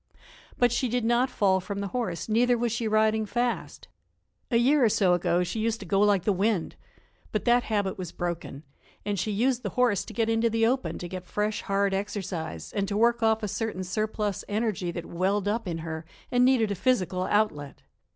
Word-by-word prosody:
But 245 -1 +3
she 245 +1 0
did 245 0 0
not 240 +3 +2
fall 195 -6 +2
from 200 +2 -5
the 200 -1 -3
horse, 225 -9 -3
neither 240 +2 +3
was 235 0 0
she 235 0 -1
riding 215 0 +2
fast. 240 +3 -2 0.6
A 235 - +3
year 270 +4 +4
or 230 - +5
so 190 -3 +3
ago 175 0 +1
she 180 +5 -4
used 225 0 0
to 200 - -8
go 195 +2 +1
like 205 -3 +3
the 205 - +2
wind. 195 -1 0 0.6
But 215 - -2
that 240 0 +4
habit 205 -3 -1
was 180 -3 -5
broken, 170 -4 -5 0.4
and 205 -2 -1
she 215 - -1
used 240 +4 +1
the - - -3
horse 240 -6 +3
to - - -9
get 225 -1 0
into 225 +1 +2
the 225 0 +2
open 260 +3 0
to 175 - -6
get 185 0 -7
fresh, 210 +2 -1
hard 200 0 0
exercise, 195 -5 -4
and 200 -1 -1
to 200 +1 -2
work 235 +2 +3
off 220 0 +2
a - - 0
certain 210 -2 -3
surplus 210 +1 -2
energy 210 -4 -1
that 170 0 -5
welled 190 +3 -1
up 215 0 -1
in 170 -2 -2
her 160 0 -5 0.3
and 245 0 +4
needed 250 -5 +3
a - - +1
physical 185 -5 0
outlet. 185 -11 -1
210 Hz, 210 wpm, -27 LUFS, 190-230 Hz, 0.6 s, or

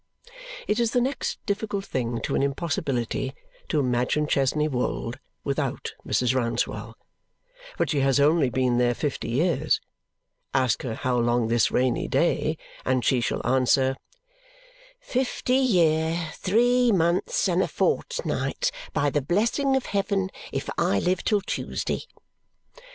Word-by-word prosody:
It 210 - +1
is 235 -1 +1
the 245 - +4
next 265 +3 -1
difficult 200 -1 -2
thing 120 - -2
to - - -2
an - - +2
impossibility 135 -3 -1 0.3
to 155 - +1
imagine 125 +3 +1
Chesney 150 +1 +1
Wold 125 - -2 0.2
without - - -2
Mrs. 125 0 +1
Rouncewell, 120 -3 -2 0.8
but - - 0
she 145 - +1
has 135 0 +3
only 145 -1 +4
been 125 -1 +1
here 120 0 +2
fifty 145 -5 -3
years. 155 +3 +1 0.8
Ask 130 -4 +2
her 115 -3 -4
how 125 0 0
long, 120 -1 +1
this 115 -1 +3
rainy 125 -1 +1
day, - - +1 0.3
and 130 -1 0
she 130 -3 +3
shall - - -2
answer 130 +1 +3 1.0
"fifty 255 - 0
year, 165 -8 +2
three 245 +5 +3
months, 185 - +1
and - - +2
a - - +1
fortnight, - - -1 0.2
by 145 0 +1
the 145 - +1
blessing 230 - +1
of 265 - 0
heaven, 195 -1 -1 0.2
if - - -3
I 100 - +2
live 180 - 0
till 210 -2 +2
Tuesday." - - -3
150 Hz, 135 wpm, -25 LUFS, 125-200 Hz, 1.0 s, the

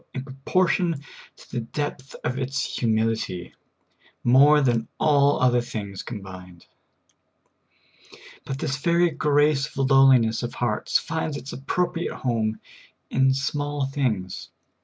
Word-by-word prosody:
in 130 - -3
proportion 165 +4 0 0.4
to - - -17
the 125 - -2
depth 135 +3 -5
of 125 +2 -2
its 135 +1 -2
humility 110 -6 -1 0.7
more 140 +5 +6
than 120 -5 +1
all 145 -1 +3
other 125 -1 +3
things 100 -5 -6
combined; 95 -5 -9 1.8
but 135 - -5
this 135 0 -2
very 170 +4 +2
grace 145 -1 +2
of 135 -1 -2
lowli 135 -1 +7
ness 115 -1 0
of 120 - -5
heart 115 -3 -2
finds 160 -3 -1
its 140 - -8
appropriate 175 +5 -2
home 110 -3 -1 0.5
in 135 0 +3
small 145 +1 -1
things. 120 -10 -2
135 Hz, 120 wpm, -24 LUFS, 115-145 Hz, 1.8 s, lowli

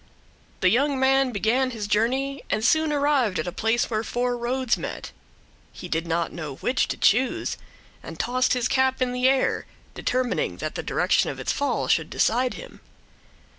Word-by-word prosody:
The 185 - +5
young 275 +4 +2
man 270 0 +3
began 240 +5 +1
his 225 -4 -5
journey 260 +7 0
and 215 - 0
soon 315 +4 +3
arrived 280 -9 +1
at 155 - -2
a 175 - -3
place 225 +5 0
where 220 -1 -2
four 245 +2 -1
roads 245 +1 0
met. - - -6 0.6
He 180 - -9
did 165 0 -2
not 170 0 -1
know 150 -5 -6
which 255 - 0
to - - -4
choose, 250 +5 +2 0.5
and - - -10
tossed 255 +1 +1
his 250 -1 0
cap 260 0 +1
in 255 -1 0
the 250 +1 +2
air, 270 -1 +1 0.3
determining 250 -1 -1
that - - -4
the - - -4
direction - - +1
of - - -6
its - - -1
fall 285 - -1
should - - +1
decide 250 +2 +1
him. - - -11
250 Hz, 175 wpm, -24 LUFS, 220-265 Hz, 0.6 s, The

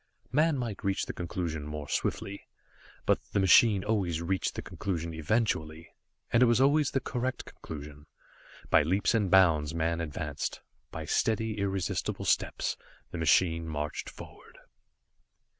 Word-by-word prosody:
Man 155 +3 +3
might 115 -6 -4
reach 95 0 0
the - - -5
conclusion 85 -3 -4
more 75 -1 -6
swiftly, 100 +6 -3 0.6
but - - +3
the - - +2
machine 95 +1 +6
always 95 -7 0
reached 90 +2 -1
the - - -5
conclusion 85 -2 -4
eventually, 80 -2 -1 0.4
and 115 - +5
it 125 - +7
was 120 +1 +3
always 145 +2 +4
the 135 - 0
correct 130 0 -3
conclusion. 75 -1 -10 0.6
By - - +7
leaps 95 +10 +1
and 105 -4 +1
bounds 80 -5 +4
man 85 +1 0
advanced. 75 -2 -4 0.3
By - - -6
steady, 110 -1 0
irresistible 95 -2 -2
steps - - 0 0.3
the - - -5
machine 80 +1 +3
marched 75 -1 -4
forward. - - -13
90 Hz, 140 wpm, -29 LUFS, 80-110 Hz, 0.6 s, it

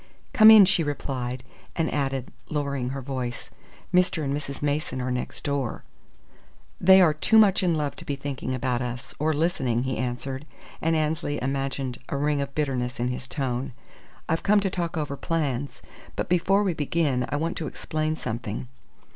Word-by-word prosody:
"Come 220 -2 +9
in," 215 -3 +10
she 180 -2 +2
replied, 130 -4 -3 0.3
and 165 -1 0
added, 135 -3 -1 0.2
lowering 140 -4 -1
her 135 0 -5
voice: 125 -2 -4 0.4
"Mr. 180 -3 +3
and 140 -1 -1
Mrs. 145 -1 -5
Mason 145 -3 -1
are 125 0 -2
next 125 0 -4
door." 140 -4 -2 1.0
"They 190 +1 +8
are 165 -4 +5
too 190 +8 +3
much 205 -3 +6
in 175 -3 +2
love 150 -2 -2
to - - -8
be 140 - -2
thinking 135 -2 -4
about 125 -1 -1
us, 120 -1 -5
or 155 +2 +2
listening," 140 -7 0
he 130 -3 -2
answered; 130 +3 -3 0.3
and 165 +1 +2
Annesley 155 -1 -1
imagined 135 -1 -2
a 140 - -1
ring 145 0 +1
of 140 0 -5
bitterness 130 -5 -1
in 120 +1 0
his 125 +1 -4
tone. 130 -2 -3 0.5
"I've 165 - 0
come 210 +1 +4
to 195 -1 -1
talk 170 -3 -2
over 150 -2 -2
plans, 145 -4 -2 0.3
but - - -2
before 185 +3 +3
we 190 -3 +1
begin 145 -4 0
I - - -1
want 165 +3 -1
to 160 - -3
explain 155 +1 -2
something. 115 -3 -4
140 Hz, 175 wpm, -26 LUFS, 130-160 Hz, 1.0 s, in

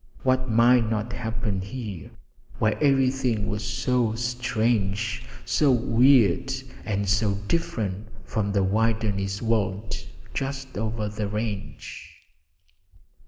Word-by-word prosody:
What 130 0 +2
might 115 0 +5
not 110 +2 -2
happen 110 -4 -2
here, 100 - -6 0.5
where 110 -1 +2
everything 130 -6 +2
was 105 0 -2
so 120 -3 0
strange, 115 -3 0 0.2
so 145 -3 +3
weird, 125 -2 +4 0.3
and 100 -2 -1
so 100 +1 +2
different 105 - -1 0.2
from 100 -2 -1
the 100 -1 +2
wilderness 100 -1 0
world 105 -2 0 0.4
just 135 -1 -4
over 110 0 -2
the 105 0 -3
range? 105 -1 -5
110 Hz, 105 wpm, -25 LUFS, 105-125 Hz, 0.5 s, might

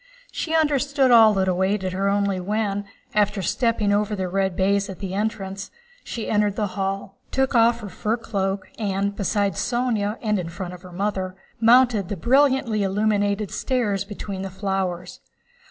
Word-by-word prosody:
She 325 -1 -2
understood 280 -3 +2
all 220 -3 +7
that 190 -1 +1
awaited 190 +1 0
her 195 +1 0
only 200 -1 +1
when, 205 +1 -1 0.3
after 205 -2 +1
stepping 225 0 +1
over 210 +1 +1
the 190 -2 -2
red 190 0 0
baize 200 +1 +1
at 190 - -7
the 190 -2 -5
entrance, 195 -2 -3 0.3
she 230 - -5
entered 210 -1 +1
the 210 -2 -1
hall, 195 0 -3
took 265 0 0
off 235 0 +4
her 210 - -6
fur 215 +5 -1
cloak, 195 -4 -2
and, 200 -1 -1
beside 200 0 0
Sónya 235 -4 -1
and 210 -2 +1
in 170 -2 -4
front 180 +1 -6
of 180 - -10
her 180 -1 -12
mother, 190 0 -2 0.2
mounted 230 -4 +4
the 205 - -3
brightly 260 - +3
illuminated 205 0 0
stairs 210 -7 0
between 200 -1 -6
the 195 - -4
flowers. 190 -2 -3
205 Hz, 165 wpm, -23 LUFS, 195-220 Hz, 0.3 s, all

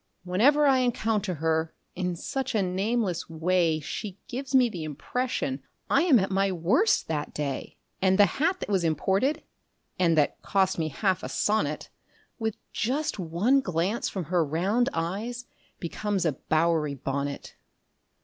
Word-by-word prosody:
Whenever 250 +12 +4
I 270 -2 +5
encounter 220 -6 0
her, 160 +1 0 0.2
in 180 -1 -2
such 265 +8 -3
a 205 - +3
nameless 190 -1 -1
way 165 0 +1
She 190 +6 -6
gives 265 +2 -3
me 255 -2 +6
the 180 -8 -6
impression 155 - -2 0.3
I - - +5
am 335 -7 +5
at 195 -2 0
my 195 0 +2
worst 185 - +2
that 150 -2 -3
day; 140 -3 -4 0.2
And 190 0 +3
the 205 - +8 0.2
hat 360 +4 +2
that - - -4
was 190 -3 +1
imported 190 - +1 0.6
(and 170 -3 +3
that 150 - +1
cost 190 -2 +1
me 160 - 0
half 185 +5 0
a - - -5
sonnet) 155 -9 0 0.5
With 220 -2 -1 0.2
just 265 +1 -1
one 185 +11 +2
glance 185 +2 -1
from 190 - -4
her 170 +2 +1
round 190 - +1
eyes 210 +9 -3 0.3
becomes 195 +2 -2
a 160 - +3
Bowery 155 0 0
bonnet. 140 +1 -4
185 Hz, 150 wpm, -27 LUFS, 165-230 Hz, 0.6 s, the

